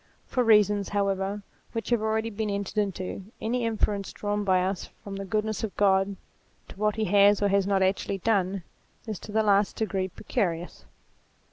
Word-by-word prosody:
For 250 - 0
reasons, 210 -3 +4
how 200 -1 +1
ever, 195 +1 -2 0.3
which 225 +1 -4
have 235 -3 +3
already 220 +1 0
been 215 0 -2
entered 200 +1 -2
into, 190 -1 -3
any 235 +2 -1
inference 210 -3 0
drawn 205 0 -2
by 185 -2 +3
us 190 0 -3
from 200 -1 -6
the 195 0 -5
goodness 215 +2 -1
of 215 - -4
God 195 0 +3 0.5
to - - -10
what 210 0 +1
he 220 0 0
has 200 +1 +5
or 205 - +2
has 195 0 +2
not 195 -1 +3
actually 195 +1 0
done, 195 -2 0 0.4
is 215 -5 -5
to - - -9
the 220 +1 +2
last 200 -1 +3
degree 195 -4 -1
precarious. 175 -3 -3
205 Hz, 180 wpm, -27 LUFS, 195-215 Hz, 0.5 s, has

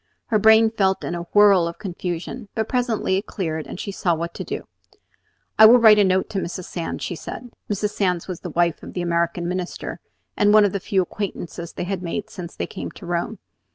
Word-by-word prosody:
Her 215 - +3
brain 220 +1 +6
felt 190 -3 +1
in - - -3
a 170 0 -5
whirl 200 -4 +6
of 170 - -6
confusion; 185 +3 -5
but 220 -1 -1
presently 240 -7 0
it 195 - -4
cleared, 160 -6 -3
and - - -8
she 200 - -4
saw 175 -3 0
what 170 +1 -4
to - - -5
do. - - -5 1.0
"I 220 - +11
will 240 +3 +8
write 220 -3 +7
a - - +6
note 190 -1 +2
to 195 - -1
Mrs. 180 0 -5
Sands," 170 -1 -5
she - - -3
said. 240 +8 -8 0.2
Mrs. 205 0 -1
Sands 180 -5 -1
was 185 -3 -5
the - - -6
wife 170 -2 +1
of - - -10
the 180 - -2
American 170 0 0
Minister, 180 0 -4 0.4
and 205 +1 +4
one 215 -1 +7
of 200 - +1
the 200 - -2
few 190 0 +1
acquaintances 175 -3 -6
they - - -4
had 185 0 -3
made 180 +4 -4
since 175 -2 -8
they - - -2
came - - -6
to 190 - -12
Rome. 175 +5 -2
190 Hz, 225 wpm, -22 LUFS, 175-210 Hz, 1.0 s, I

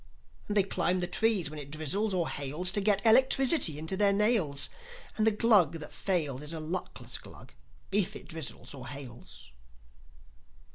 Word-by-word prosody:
And 210 - -1
they 200 - +5
climb 185 -1 0
the 180 - -1
trees 205 -6 +1
when 155 - -8
it 140 -1 -9
drizzles 160 +8 -2
or 180 -3 -1
hails 150 +6 0
To 205 - 0
get 200 +1 +1
electricity 260 - +4
into 160 +5 -2
their 200 0 +4
nails; 200 -9 +2 0.5
And 220 0 +1
the - - +5
Glug 205 -7 +3
that 155 -2 -9
fails 150 -9 -2
Is 150 +2 -5
a 160 - -5
luckless 170 +4 -5
Glug, - - -14 0.4
if 195 -2 +3
it - - -9
drizzles 155 -6 -5
or 130 -2 -10
hails." 130 - -10
180 Hz, 170 wpm, -29 LUFS, 150-205 Hz, 0.5 s, they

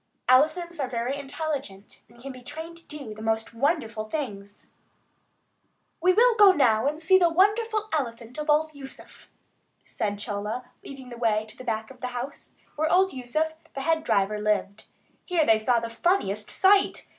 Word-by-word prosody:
Elephants 315 +6 +3
are 270 - -1
very 245 +2 -2
intelligent, 280 -8 -6
and 235 +1 -20
can 270 +3 -7
be 255 -1 -11
trained 320 +6 -8
to 335 - -14
do 280 -8 -7
the 215 - -11
most 225 0 -1
wonderful 230 -5 -1
things. 205 -9 -6 1.4
"We 365 +2 +5
will 470 +6 +5
go 405 -3 +8
now 240 -6 +3
and 300 +2 -2
see 375 +4 +4
the 345 -2 +4
wonderful 425 +5 +2
elephant 240 -3 -3
of 300 +1 -4
old 310 +1 +2
Yusuf," 275 -2 -13 0.6
said 205 -1 -3
Chola, 210 +4 -4
leading 265 -2 -10
the 240 - -9
way 215 -2 +1
to 215 - -12
the - - -11
back 220 0 -3
of 255 - -16
the 250 - -2
house, 260 +4 -7 0.2
where 315 +1 0
old 380 +1 +3
Yusuf, 290 +5 -2 0.2
the 275 - -3
head 320 +2 +1
driver, 210 -5 +1
lived. 210 0 -1 0.4
Here 345 -4 +1
they 220 -4 +4
saw 240 +2 +2
the 230 - -4
funniest 230 - 0
sight. 390 +1 +3
265 Hz, 175 wpm, -26 LUFS, 220-320 Hz, 1.4 s, go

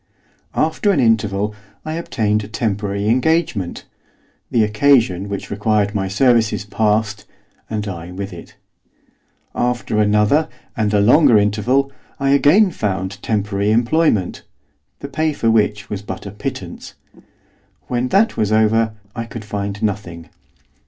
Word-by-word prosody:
After 160 +6 +1
an 195 - +3
interval 105 -3 +1 0.3
I 155 - -3
obtained 105 -10 -1
a - - -8
temporary 105 -2 -2
engagement; 125 - 0 0.6
the 115 - +2
occasion 105 -4 +2
which 100 -1 -5
required 105 0 +1
my 95 -2 -1
services 110 0 +2
passed, 110 0 0 0.4
and 105 -1 -3
I 90 -2 -6
with 95 +1 -6
it. 85 - -12 1.0
After 120 -3 -1
another, 105 +9 +3 0.3
and 110 -2 0
a 105 - +3
longer 125 +3 +5
interval, 110 +7 +1 0.3
I 135 0 +1
again 170 +9 +5
found 95 - -3
temporary 105 -1 -1
employment, 115 - +1 0.6
the - - -5
pay 155 -1 -1
for 115 -5 +1
which 105 -2 +1
was 100 -2 -5
but 105 - -7
a 100 - -6
pittance. 105 - -7 0.9
When 125 0 -2
that 205 - +2
was 105 -1 0
over 110 0 +2 0.2
I 115 -1 -4
could 115 -2 -9
find 100 0 -4
nothing. 95 -6 -3
105 Hz, 130 wpm, -19 LUFS, 100-120 Hz, 1.0 s, longer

